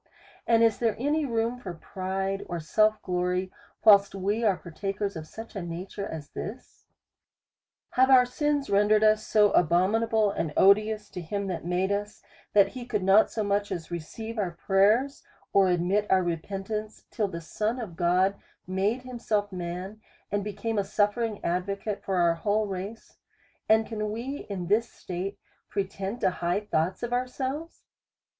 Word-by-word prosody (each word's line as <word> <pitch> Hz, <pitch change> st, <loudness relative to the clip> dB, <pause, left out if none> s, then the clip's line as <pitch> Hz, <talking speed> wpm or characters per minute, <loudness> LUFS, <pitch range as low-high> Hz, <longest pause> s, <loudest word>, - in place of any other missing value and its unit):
And 230 Hz, -1 st, +5 dB
is 225 Hz, -2 st, +3 dB
there 230 Hz, -2 st, +1 dB
any 290 Hz, +4 st, 0 dB
room 230 Hz, +1 st, -1 dB
for 185 Hz, -8 st, -7 dB
pride 190 Hz, +3 st, -3 dB
or 175 Hz, -1 st, -3 dB
self 215 Hz, +7 st, +2 dB
glory, 180 Hz, +1 st, -1 dB, 0.3 s
whilst 200 Hz, -2 st, +6 dB
we 200 Hz, +4 st, -1 dB
are 200 Hz, -5 st, +3 dB
partakers 195 Hz, +4 st, -4 dB
of 160 Hz, -1 st, -7 dB
such 225 Hz, +7 st, -10 dB
a 195 Hz, -, -3 dB
nature 180 Hz, +4 st, -5 dB
as 155 Hz, -3 st, -7 dB
this 230 Hz, +5 st, -8 dB, 0.6 s
.' -, -, -67 dB
Have 260 Hz, +1 st, +5 dB
our 255 Hz, -2 st, +7 dB
sins 290 Hz, +2 st, 0 dB
rendered 210 Hz, +2 st, +4 dB
us 215 Hz, 0 st, +4 dB
so 210 Hz, -2 st, +4 dB
abominable 205 Hz, +6 st, +3 dB
and 160 Hz, -6 st, -3 dB
odious 210 Hz, +2 st, +4 dB
to 180 Hz, -, -6 dB
him 200 Hz, +5 st, -3 dB
that 175 Hz, -3 st, -4 dB
made 180 Hz, +2 st, 0 dB
us, 205 Hz, +1 st, -3 dB, 0.3 s
that 200 Hz, -1 st, +6 dB
he 255 Hz, -2 st, -7 dB
could 210 Hz, -5 st, -1 dB
not 195 Hz, +3 st, +5 dB
so 220 Hz, -, -2 dB
much 205 Hz, 0 st, 0 dB
as 165 Hz, -1 st, -5 dB
re 170 Hz, -, -2 dB
ceive 220 Hz, +8 st, -7 dB
our 175 Hz, -4 st, -2 dB
prayerSj 215 Hz, +8 st, +3 dB, 0.3 s
or 195 Hz, -1 st, +5 dB
admit 180 Hz, +4 st, +1 dB
oup 185 Hz, -1 st, +4 dB
repentance, 195 Hz, +5 st, -4 dB
till 215 Hz, -4 st, 0 dB
the 170 Hz, -3 st, -6 dB
Son 215 Hz, +8 st, -2 dB
of 205 Hz, -8 st, -6 dB
God 180 Hz, +3 st, +3 dB, 0.3 s
made 200 Hz, +7 st, -1 dB
himself 220 Hz, -5 st, -2 dB
man, 180 Hz, +4 st, -5 dB, 0.3 s
and 205 Hz, 0 st, 0 dB
became 210 Hz, +2 st, -2 dB
a -, -, +1 dB
suttering" 210 Hz, +2 st, 0 dB
ad 180 Hz, +2 st, 0 dB
vocate 200 Hz, +1 st, -4 dB
for 195 Hz, -, -1 dB
our 170 Hz, -2 st, +4 dB
whole 205 Hz, +6 st, 0 dB
race; 195 Hz, +3 st, -7 dB, 0.5 s
and 220 Hz, 0 st, +5 dB
can 215 Hz, -2 st, -3 dB
we 255 Hz, +6 st, -5 dB
in 190 Hz, -3 st, -3 dB
this 215 Hz, +6 st, +1 dB
state 185 Hz, +2 st, -5 dB, 0.3 s
pretend 195 Hz, +2 st, -3 dB
to -, -, +3 dB
high 175 Hz, +3 st, -1 dB
thoughts 180 Hz, -1 st, -1 dB
of 240 Hz, 0 st, -2 dB
ourselves? 260 Hz, +6 st, -3 dB
205 Hz, 170 wpm, -27 LUFS, 185-220 Hz, 0.6 s, our